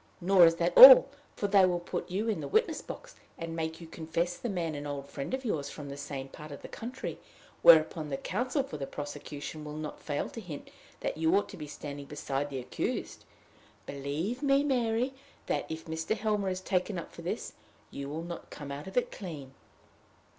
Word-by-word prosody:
Nor 180 -1 +7
is 165 - +3
that 170 +1 0
all; - - +12 0.3
for 205 - -1
they 200 -1 +6
will 180 -1 +3
put 175 - -5
you 200 +5 -1
in 220 - 0
the - - -4
witness 445 +2 +1
box, - - -9 0.2
and 165 0 -5
make 160 0 -3
you 170 - -9
confess 165 +2 -2
the 240 - -4
man 170 -5 -2
an 145 0 -5
old 140 -1 -5
friend 140 -1 -6
of 260 0 -3
yours 145 -10 -1
from 145 -2 -8
the 140 - -6
same 140 -1 -6
part 150 +2 -11
of 140 - -9
the - - -6
country; 245 +3 -6 0.4
whereupon 160 -1 +6
the 135 - -2
counsel 255 - -1
for 270 - -7
the 135 -2 -4
prosecution 145 +1 -6
will 150 0 -7
not 155 -1 -6
fail 145 -2 -2
to 230 - -7
hint 160 -8 -9 0.3
that - - -2
you 160 +3 +3
ought 205 - 0
to - - -8
be 150 -2 -7
standing 145 -1 -7
beside 145 -1 -3
the 135 - -5
accused. 125 -1 -4 0.6
Believe 145 - -3
me, 280 -1 +3
Mary, 250 -2 +1 0.3
that, - - -2
if 160 0 -6
Mr. 160 +7 -2
Helmer 210 -2 0
is 185 0 -3
taken 185 +1 -1
up 170 - -6
for - - -10
this, - - -4 0.4
you 140 0 -6
will 160 +3 -4
not 170 0 -7
come 145 -1 -8
out 140 +4 -6
of 190 - -7
it 250 - +2
clean." 150 -8 -8
165 Hz, 210 wpm, -30 LUFS, 145-205 Hz, 0.6 s, all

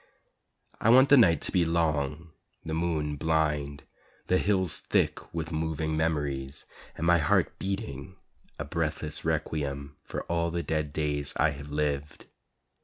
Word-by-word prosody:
I 110 - +2
want 130 +3 +7
the 145 - +8
night 85 - +5
to - - -5
be 90 -3 +3
long, 80 -1 0 0.3
the 80 - -3
moon 80 -3 -1
blind, 75 -2 0 0.4
The 90 - +2
hills 95 -5 +1
thick - - 0
with 80 0 -4
moving 80 0 -1
memories, 75 -3 -2 0.3
And 80 - -3
my 85 0 +5
heart 75 - +1
beating 95 -4 -4 0.4
a 75 - -4
breathless 75 0 -2
requiem 70 -2 -2
For - - -5
all 85 0 0
the 85 0 -2
dead 75 -2 -1
days 75 -1 -1
I 80 +1 +3
have 70 0 -9
lived. 75 -1 -2
80 Hz, 145 wpm, -28 LUFS, 75-85 Hz, 0.4 s, the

